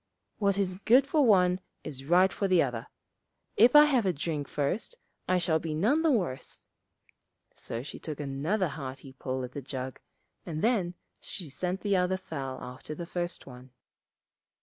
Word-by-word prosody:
What 200 -2 +2
is 185 -2 0
good 250 +4 +6
for 295 +1 +3
one 185 -6 +4 0.2
is 135 -3 -7
right 180 +5 +4
for 200 - 0
the 185 -3 +5
other. 120 -4 -4 0.7
If 240 +6 +6
I 295 0 +10
have 265 -6 +3
a - - +4
drink 150 -2 -3
first 150 - -2 0.3
I 185 - +3
shall 170 -3 +2
be 160 -1 -3
none 230 - +3
the 325 - +3
worse.' 180 - -2 0.9
So 115 +1 -6
she 145 - -8
took 155 -2 -6
another 150 +7 -1
hearty 135 -2 -7
pull 130 0 -3
at 125 - -6
the 140 - -6
jug, 130 -1 -5 0.4
and 155 -2 -4
then 200 -7 +1 0.2
she 175 -6 -6
sent 180 +7 -3
the 200 -2 +2
other 180 +1 +1
fowl 135 -8 -5
after 130 +4 -7
the 170 - -5
first 175 0 -4
one. 125 -1 -13
175 Hz, 170 wpm, -29 LUFS, 135-195 Hz, 0.9 s, I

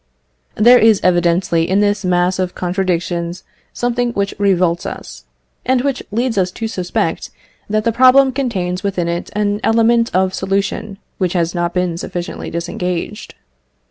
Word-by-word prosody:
There 245 +3 +6
is 220 -3 +5
evidently 175 -1 +2
in 190 +2 +2
this 205 0 +1
mass 180 0 +1
of 185 -1 -2
contradictions 175 -1 -2 0.3
something 245 0 -1
which 200 -2 -1
revolts 180 -4 +2
us, 60 0 -9 0.4
and 255 0 +2
which 275 -1 -1
leads 230 0 0
us 185 -1 +1
to 225 - -4
suspect 180 -5 -2 0.4
that 215 +1 0
the 230 - +1
problem 260 +3 +5
contains 195 -9 -2
within 185 -3 -1
it 170 0 -3
an 205 0 0
element 230 +1 +3
of 185 0 +2
solution 195 +1 -2 0.2
which 185 -3 0
has 170 -2 0
not 175 0 -2
been 180 -2 -1
sufficiently 175 0 -5
disengaged. 175 +4 -4
190 Hz, 145 wpm, -17 LUFS, 175-225 Hz, 0.4 s, There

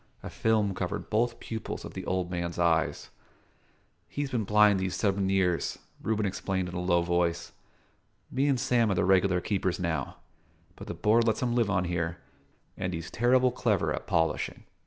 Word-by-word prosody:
A - - -6
film 110 -3 +1
covered - - -4
both 115 +2 +1
pupils 110 -1 -5
of - - -8
the - - -6
old 90 -1 -1
man's 85 -1 -3
eyes. 85 -2 +1 1.0
"He've 145 -1 -4
been 115 -4 -1
blind 105 -1 +5
these 95 -1 -2
seven 100 -2 +1
years," 90 -3 +1 0.2
Reuben 110 -1 0
explained 95 -1 -2
in - - -9
a 90 - -3
low 85 -1 +2
voice. 85 -1 0 0.8
"Me 135 +2 +1
and 135 -3 +2
Sam 120 -2 +2
are 100 - +1
the 90 - +1
regular 95 -1 +3
keepers 95 -2 -1
now; 80 -6 -2 0.6
but - - -10
the - - -5
Board 110 +7 +3
lets 110 +2 +1
him 120 -1 0
live 120 -3 +2
on 95 -3 +1
here, 85 -1 -2 0.6
and 90 -2 -3
he's 85 0 -6
terrible 125 +2 +3
clever 105 -11 0
at - - -5
polishing." 80 -2 0
95 Hz, 180 wpm, -28 LUFS, 85-110 Hz, 1.0 s, blind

